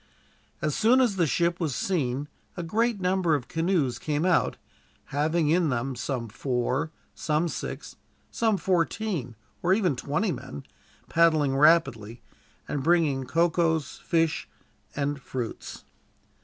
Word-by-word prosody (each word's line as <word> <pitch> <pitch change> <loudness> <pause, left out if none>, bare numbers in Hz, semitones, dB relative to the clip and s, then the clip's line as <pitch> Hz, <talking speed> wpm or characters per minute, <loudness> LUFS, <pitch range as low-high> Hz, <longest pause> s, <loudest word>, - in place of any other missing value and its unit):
As 150 -1 +1
soon 235 +4 +4
as 240 -6 +3
the 175 -4 +2
ship 170 +4 +1
was 155 -7 -1
seen 145 -6 -1 0.3
a 175 - -3
great 225 +5 0
number 180 -3 +2
of 125 -4 -4
canoes 165 -6 0
came 150 +2 -1
out, 185 -2 +2 0.6
having 155 +2 +1
in 170 0 +3
them 125 +1 -2
some 120 0 -3
four, 130 +6 -1 0.2
some 155 +2 0
six, - - -6 0.3
some 220 -3 +1
fourteen, 175 - -1 0.3
or 185 +2 +3
even 185 -9 +1
twenty 150 - -1
men, 70 - -7 0.4
paddling 155 -5 +3
rapidly 135 -7 +3 0.4
and 145 - -2
bringing 150 -4 +2
cocoas, 165 0 +1
fish, 165 -2 0 0.5
and 140 -1 -2
fruits. 125 -5 -6
160 Hz, 130 wpm, -27 LUFS, 135-175 Hz, 0.6 s, soon